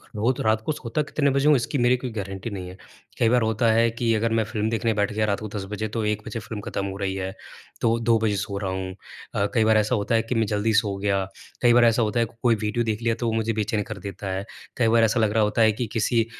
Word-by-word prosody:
रोज 115 +5 0
रात 110 0 +2
को - - 0
सोता 140 0 -2
कितने 145 -1 0
बजे 140 +2 +2
हूँ, 150 - +7
इसकी 135 +3 -1
मेरी 125 0 +3
कोई 125 0 -5
गारंटी 95 0 -5
नहीं 95 -4 -6
है। 90 - -11 0.4
कई 115 - +4
बार 125 +1 +3
होता 110 +1 +1
है 115 +1 +4
कि 115 0 0
अगर 115 +1 0
मैं 115 0 +2
फ़िल्म 110 0 -2
देखने 115 0 0
बैठ 105 -1 0
गया 110 +1 +1
रात 100 -1 0
को 110 - -5
10 100 -2 -3
बजे 110 +1 -2
तो 110 +1 -3
1 105 0 -1
बजे 115 - -4
फ़िल्म 110 -1 -7
ख़त्म 100 - -2
हो 95 0 -5
रही 95 -1 -2
है, 95 0 -3 0.5
तो 115 0 +2
2 115 0 +3
बजे 110 -2 +1
सो 100 +1 -3
रहा 100 -2 -2
हूँ। 95 0 -4 0.4
अ, 100 - +2
कई 115 -3 +3
बार 110 0 +4
ऐसा 110 +3 +2
होता 105 +1 0
है 115 - +4
कि 125 +1 -3
मैं 115 -1 +2
जल्दी 105 +2 0
सो 105 -2 +2
गया, 100 -1 0 0.4
कई 120 -1 +5
बार 120 0 +6
ऐसा 115 +1 +3
होता 110 +1 0
है 115 - +3
कोई 115 +1 0
वीडियो 105 +2 -1
देख 110 0 -2
लिया 115 -1 +1
तो 120 - -3
वो 115 - 0
मुझे 110 0 0
बेचैन 110 0 -1
कर 105 -2 -7
देता 95 0 -6
है, 95 +1 -3 0.3
कई 120 - +3
बार 115 0 +4
ऐसा 115 +2 +2
लग 110 -2 +2
रहा 110 -1 +3
होता 105 +2 +1
है 110 -1 +6
कि 115 +3 -3
किसी 115 +1 +2
110 Hz, 285 wpm, -24 LUFS, 105-115 Hz, 0.5 s, हूँ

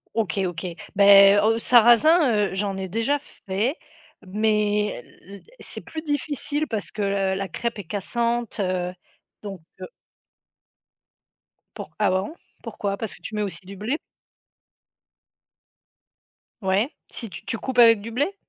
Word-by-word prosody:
OK, 210 -4 -1
OK, 175 0 -6 0.3
ben, 200 0 +8
heu, 225 +1 +2
sarrasin, 240 - +5
heu, - - -6
j'en 195 0 -2
ai 190 0 -4
déjà 230 +9 0
fait 230 -1 -3 0.5
mais 210 - 0 0.2
l 200 0 -11 0.2
c'est - - -6
plus 320 -1 -7
difficile 290 0 -2
parce 215 -5 -3
que 215 - -6 0.3
la 195 0 -3
crêpe 235 +5 -3
est - - -5
cassante, 235 +5 -2
heu, 180 -1 -1 0.5
donc 195 -3 -7 0.2
heu - - -6 1.9
Pour - - -8
ah 210 - +3
bon? 190 +9 -1 0.3
Pourquoi? 200 -1 -3
Parce 220 -1 -4
que - - -16
tu 215 - -7
mets 210 - -1
aussi 185 -2 -5
du 195 +2 -9
blé? 220 +10 -2 2.6
Ouais, 195 +6 +1 0.2
si 230 - -6
tu 195 - -11
tu 225 - -3
coupes 255 +2 -2
avec 230 -3 +7
du 230 +3 -7
blé? 290 - -1
210 Hz, 140 wpm, -24 LUFS, 195-235 Hz, 2.6 s, ben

